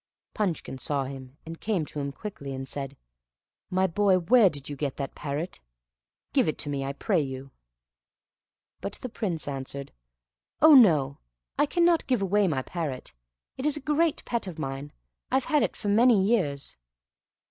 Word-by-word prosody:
Punchkin 170 Hz, -10 st, -2 dB
saw 140 Hz, +2 st, 0 dB
him, 135 Hz, 0 st, -9 dB
and 165 Hz, 0 st, -8 dB
came 200 Hz, -8 st, 0 dB
to 150 Hz, -, -6 dB
him 140 Hz, 0 st, -2 dB
quickly, 140 Hz, -5 st, -7 dB
and 135 Hz, 0 st, -5 dB
said, 135 Hz, 0 st, -3 dB, 0.7 s
"My 185 Hz, +1 st, +2 dB
boy, 190 Hz, +1 st, +3 dB
where 210 Hz, +4 st, +5 dB
did 145 Hz, -3 st, -6 dB
yon 145 Hz, -, -6 dB
get 140 Hz, -1 st, -3 dB
that 140 Hz, -1 st, -4 dB
parrot? 150 Hz, +4 st, -4 dB, 0.7 s
Give -, -, +3 dB
it 155 Hz, -, -1 dB
to 145 Hz, -, -2 dB
me, 140 Hz, -1 st, -2 dB
I 135 Hz, +1 st, -3 dB
pray 180 Hz, +4 st, +1 dB
you." 135 Hz, -1 st, -6 dB, 1.3 s
But -, -, -5 dB
the 255 Hz, -, -3 dB
Prince 185 Hz, -10 st, -2 dB
answered, 135 Hz, 0 st, -5 dB, 0.7 s
"Oh 315 Hz, +1 st, +8 dB
no, 155 Hz, -, +6 dB, 0.4 s
I -, -, +2 dB
cannot 340 Hz, +1 st, +3 dB
give 250 Hz, -6 st, +1 dB
away 200 Hz, +1 st, +3 dB
my 135 Hz, -6 st, 0 dB
parrot, 150 Hz, -, -5 dB, 0.4 s
it 260 Hz, -, -4 dB
is 300 Hz, -, +3 dB
a -, -, -3 dB
great 300 Hz, +2 st, +1 dB
pet 235 Hz, -4 st, -2 dB
of 175 Hz, -3 st, -7 dB
mine; 140 Hz, 0 st, -5 dB, 0.4 s
I -, -, 0 dB
have 265 Hz, -, +2 dB
had 300 Hz, -2 st, +2 dB
it -, -, -2 dB
many 220 Hz, +2 st, +5 dB
years." 175 Hz, -11 st, 0 dB
165 Hz, 170 wpm, -27 LUFS, 140-215 Hz, 1.3 s, Oh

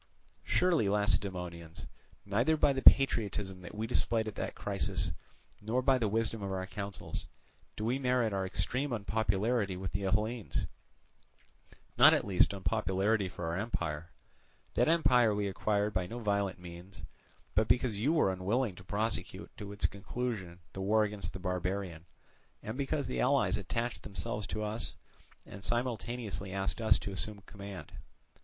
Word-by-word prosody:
"Surely, 170 Hz, -, +3 dB
Lacedaemonians, 90 Hz, -5 st, -1 dB, 0.4 s
neither 120 Hz, +10 st, +2 dB
by 145 Hz, -2 st, +4 dB
the 135 Hz, -, -2 dB
patriotism 105 Hz, -9 st, +5 dB
that 90 Hz, -, -9 dB
we 110 Hz, +1 st, -2 dB
displayed 115 Hz, -1 st, +1 dB
at 110 Hz, -, -4 dB
that -, -, -4 dB
crisis, -, -, -1 dB, 0.5 s
nor 115 Hz, +5 st, 0 dB
by 130 Hz, -1 st, +4 dB
the 115 Hz, -, +1 dB
wisdom 110 Hz, +1 st, 0 dB
of 100 Hz, -1 st, -3 dB
our 95 Hz, -1 st, -2 dB
counsels, 100 Hz, 0 st, -5 dB, 0.5 s
do 105 Hz, -, -2 dB
we 125 Hz, +4 st, +1 dB
merit 125 Hz, -4 st, +2 dB
our 95 Hz, -1 st, 0 dB
extreme 125 Hz, +9 st, -1 dB
unpopularity 105 Hz, -1 st, 0 dB
with 95 Hz, -1 st, -4 dB
the 100 Hz, -, -2 dB
Hellenes, 105 Hz, +4 st, 0 dB, 1.3 s
not -, -, +9 dB
at -, -, 0 dB
least 95 Hz, -3 st, +4 dB
unpopularity 100 Hz, 0 st, +1 dB
for 85 Hz, -, -6 dB
our 80 Hz, +1 st, -1 dB
empire. 85 Hz, -6 st, -3 dB, 0.6 s
That -, -, +3 dB
empire 125 Hz, -9 st, +4 dB
we 100 Hz, -1 st, 0 dB
acquired 105 Hz, +1 st, 0 dB
by 90 Hz, -1 st, 0 dB
no 115 Hz, -, -6 dB
violent 100 Hz, -4 st, 0 dB
means, 90 Hz, +2 st, -11 dB, 0.5 s
but 110 Hz, 0 st, +3 dB
because 120 Hz, -5 st, +2 dB
you 135 Hz, +8 st, +2 dB
were 155 Hz, -, +3 dB
unwilling 100 Hz, +5 st, 0 dB
to 90 Hz, -, -11 dB
prosecute 105 Hz, +3 st, -2 dB
to 100 Hz, -1 st, -7 dB
its 100 Hz, -, 0 dB
conclusion 100 Hz, -4 st, -3 dB
the 95 Hz, -, -5 dB
war 110 Hz, +3 st, +4 dB
against 105 Hz, -1 st, -2 dB
the 95 Hz, -, -7 dB
barbarian, 90 Hz, -2 st, -3 dB, 0.6 s
and 110 Hz, +2 st, -4 dB
because 140 Hz, +2 st, -1 dB
the 65 Hz, -, -2 dB
allies -, -, +3 dB
attached 120 Hz, +1 st, -3 dB
themselves 105 Hz, 0 st, -4 dB
to 110 Hz, -, -3 dB
us 105 Hz, +2 st, -3 dB, 0.5 s
and 100 Hz, 0 st, -10 dB
spontaneously 120 Hz, -5 st, -2 dB
asked 95 Hz, +4 st, -2 dB
us 110 Hz, -2 st, +5 dB
to 100 Hz, -, -5 dB
assume 105 Hz, +3 st, -3 dB
the 100 Hz, -, -16 dB
command. 100 Hz, -2 st, -9 dB
105 Hz, 155 wpm, -32 LUFS, 95-115 Hz, 1.3 s, not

